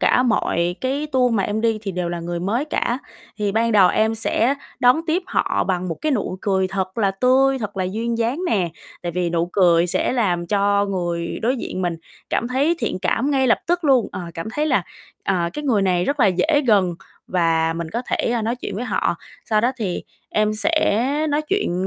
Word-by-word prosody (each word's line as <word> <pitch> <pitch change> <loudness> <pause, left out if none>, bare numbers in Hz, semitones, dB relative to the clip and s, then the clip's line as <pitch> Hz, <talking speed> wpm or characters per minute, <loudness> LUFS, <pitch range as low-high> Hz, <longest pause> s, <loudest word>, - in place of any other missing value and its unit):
cả 250 - +4
mọi 175 -7 +1
cái 275 +4 -1
tour 250 -2 +3
mà 200 - +2
em 210 +3 -1
đi 225 -1 +1
thì 200 -2 -4
đều 180 -1 -2
là 175 0 -3
người 170 0 -4
mới 225 +10 0
cả. 255 -5 -1 0.4
Thì 205 -2 0
ban 230 +1 +1
đầu 195 -4 +6
em 220 +4 +2
sẽ 230 +3 +1 0.3
đón 250 +5 +5
tiếp 335 +4 +1
họ - - 0
bằng 185 -1 -1
một 165 - -3
cái 305 -2 0
nụ 205 -5 -2
cười 190 -2 +1
thật 190 +1 -3
là 200 -3 +3
tươi, 260 +6 +3
thật 205 -3 -5
là 185 - 0
duyên 230 +5 -2
dáng 240 +8 0
nè, 185 - +1 0.3
tại 175 -1 -3
vì 175 -1 -1
nụ 170 0 0
cười 175 -3 +4
sẽ 175 - 0
làm 180 -8 0
cho 200 +1 +2
người 175 -3 -2
đối 250 +4 +1
diện 185 -5 -4
mình 175 -2 -1 0.3
cảm 235 - 0
thấy 280 +7 +2
thiện - - -2
cảm 270 +5 +1
ngay 265 -2 +2
lập 230 - +4
tức 350 0 0
luôn, 260 -6 +4
ờ, - - -5
cảm 165 +6 -5
thấy 300 +1 0
là, 260 -11 +2 0.4
ờ, 195 - +1 0.2
cái 295 - -5
người 225 -7 +2
này 180 -2 +2
rất 285 +5 -1
là 215 - +6
dễ 285 - +2
gần 195 -6 +3 0.3
và 165 -2 +1
mình 165 -1 -4
có 235 +3 -2
thể, - - 0
a, 235 -2 0
nói 230 +3 -1
chuyện 205 - -6
với 240 - -3
họ. - - 0 0.4
Sau 215 -1 +4
đó 245 +4 +1
thì 200 -7 -3 0.3
em 215 0 +1
sẽ 245 -3 +2 0.2
nói 295 +1 +1
chuyện, 245 - -1
215 Hz, 220 wpm, -21 LUFS, 180-250 Hz, 0.4 s, đầu